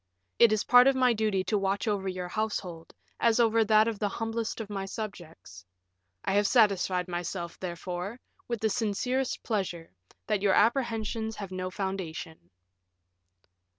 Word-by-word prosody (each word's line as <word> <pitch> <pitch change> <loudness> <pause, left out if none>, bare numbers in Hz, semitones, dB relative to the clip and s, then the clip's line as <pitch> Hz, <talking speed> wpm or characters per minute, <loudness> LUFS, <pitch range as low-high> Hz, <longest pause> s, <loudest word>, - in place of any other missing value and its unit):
It 230 - +7
is 215 -1 +1
part 245 +1 +7
of 270 - +4
my 255 -2 +4
duty 210 -4 0
to 210 +1 0
watch 195 +2 -1
over 200 -2 -1
your 185 -1 -3
household, 180 -5 -4 0.3
as 230 0 +3
over 225 -1 +4
that 215 +1 +5
of 225 -3 -2
the 205 - 0
humblest 225 +2 -3
of 220 - -5
my 200 -2 -4
subjects. 175 - -8 0.6
I - - 0
have 205 0 +3
satisfied 195 -6 +3
myself, 175 0 -4
therefore, 180 +4 -5 0.3
with 235 -3 -3
the 220 - +2
sincerest 245 +5 -1
pleasure, 185 -7 -3 0.3
that 210 -3 0
your 200 -1 +3
apprehensions 225 -1 +1
have 195 -3 -7
no 185 0 -3
foundation." 180 - -5
205 Hz, 150 wpm, -28 LUFS, 185-225 Hz, 0.6 s, It